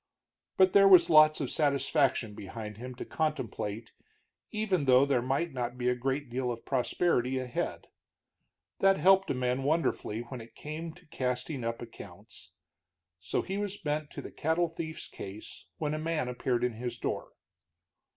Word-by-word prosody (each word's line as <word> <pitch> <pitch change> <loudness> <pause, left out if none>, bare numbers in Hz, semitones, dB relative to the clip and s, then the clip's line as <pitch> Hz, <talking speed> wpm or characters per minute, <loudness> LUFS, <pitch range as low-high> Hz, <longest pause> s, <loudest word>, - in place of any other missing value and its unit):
But 190 -1 +5
there 195 0 +7
was 175 -3 +7
lots 155 0 +7
of 135 - -2
satisfaction 140 -5 +1
behind 105 +1 -7
him 125 +2 -7
to - - -6
contemplate 115 -8 -3 0.6
even 200 -8 0
though 130 +1 +6
there 140 -4 +2
might 135 +6 -1
not 125 -1 -3
be 125 0 +1
a 125 - +2
great 135 +3 -2
deal 125 +1 -2
of 115 -1 -7
prosperity 130 0 +1
ahead. 125 -2 -3 0.9
That 195 0 +5
helped 190 +4 +5
a - - 0
man 125 +1 0
wonderfully 140 -6 0
when 120 +1 -8
it 115 - -14
came 160 +2 -6
to 180 - -19
casting 130 -1 -3
up 115 +1 -3
accounts. 115 - -12 0.7
So 85 - -1
he 195 +1 -3
was 205 -1 -3
bent 150 -5 -2
to - - -6
the - - -8
cattle 165 +2 0
thief's 160 -1 -6
case 100 +2 -9
when 150 -1 -1
a 155 - -2
man 155 -4 -1
appeared 125 0 -1
in 125 -1 +1
his 120 +1 -5
door. - - -4
135 Hz, 165 wpm, -30 LUFS, 120-160 Hz, 0.9 s, there